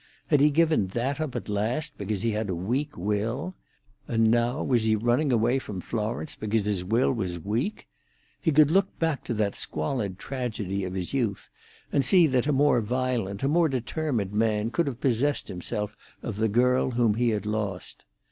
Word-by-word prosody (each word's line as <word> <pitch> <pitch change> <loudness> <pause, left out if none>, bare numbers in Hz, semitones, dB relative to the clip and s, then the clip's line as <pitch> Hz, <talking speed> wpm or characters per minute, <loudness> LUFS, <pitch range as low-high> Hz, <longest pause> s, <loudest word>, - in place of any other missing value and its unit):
Had 150 - +4
he 150 - +6
given 155 - +3
that 125 +9 -2
up 155 -5 -3
at - - -4
last 120 +9 -1
because 100 0 -3
he 115 -2 +1
was 105 -1 -2
a 90 - -1
weak 125 - -2
will? 105 - -2 0.5
And 115 -1 +3
now 120 +4 +1
was 125 -4 +2
he 110 0 +2
running 120 +6 +1
away 120 +3 +2
from 105 -7 -6
Florence 115 - -3
because 110 -1 -1
his 100 -4 0
will 115 +9 +2
was 95 -7 -3
weak? 110 - -3 0.5
He 165 - +2
could 150 0 +5
look 195 +2 +2
back 160 -4 0
to - - -2
that 105 -2 0
squalid 95 - -3
tragedy 105 -5 -3
of 90 0 -5
his 90 +3 -4
youth, 115 -7 -1 0.4
and 140 - +2
see 175 +6 +6
that 130 -2 +1
a - - +3
more 140 -3 +4
violent, 120 -3 -1
a - - +3
more 165 +2 +3
determined 125 -5 -2
man 110 0 +1
could 165 +6 +1
have 125 -4 -4
possessed 135 +3 0
himself 105 +3 -4 0.3
of 110 -4 -4
the 110 +1 +1
girl 125 +4 +3
whom 120 -3 +2
he 120 +2 +1
had 105 -2 -1
lost. 105 -4 -4
115 Hz, 190 wpm, -27 LUFS, 105-135 Hz, 0.5 s, he